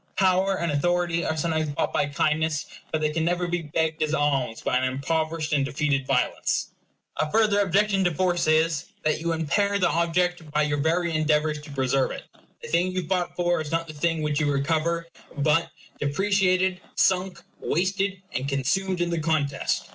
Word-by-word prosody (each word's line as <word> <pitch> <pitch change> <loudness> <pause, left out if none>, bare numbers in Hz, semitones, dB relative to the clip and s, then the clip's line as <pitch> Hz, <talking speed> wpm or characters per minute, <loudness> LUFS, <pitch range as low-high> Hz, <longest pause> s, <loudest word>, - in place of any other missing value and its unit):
Power 190 0 +3
and 170 -2 -1
authority 170 +3 +1
are 160 - -1
sometimes 155 -1 0
bought 145 - -2
by 145 - +1
kindness; 155 +1 0 0.3
but 155 - -1
they 155 0 +1
can 160 +1 -1
never 175 +1 0
be 175 0 -1
begged 160 +1 -1
as 155 0 +1
alms 140 -6 0
by - - 0
an 130 - 0
impoverished 155 +4 -1
and 140 -2 +3
defeated 140 -1 -1
violence. - - 0 0.5
A 155 - 0
further 215 -2 +3
objection 200 0 +2
to 175 - +3
force 175 +1 0
is, 155 -1 +2 0.2
that 155 +1 0
you 170 0 -1
impair 185 +6 +1
the 180 -3 +2
object 170 0 0
by 150 +1 +1
your 145 -1 0
very 170 +3 +1
endeavors 155 -1 +1
to 150 - -12
preserve 135 -1 +1
it. - - -7 0.4
The - - -7
thing 175 +2 +2
you 185 -1 -2
fought 180 -1 -1
for 175 -2 +1
is 150 - -6
not 165 0 0
the 155 - -9
thing 160 +1 -1
which 150 -1 0
you 145 -2 +1
recover; 160 +4 0 0.3
but 150 +3 +2 0.3
depreciated, 185 +3 +1
sunk, 185 0 +1 0.2
wasted, 190 +2 -1
and 130 +3 -2
consumed 180 +7 0
in 175 0 0
the 170 - 0
contest. 150 -3 0
160 Hz, 185 wpm, -25 LUFS, 150-180 Hz, 0.5 s, Power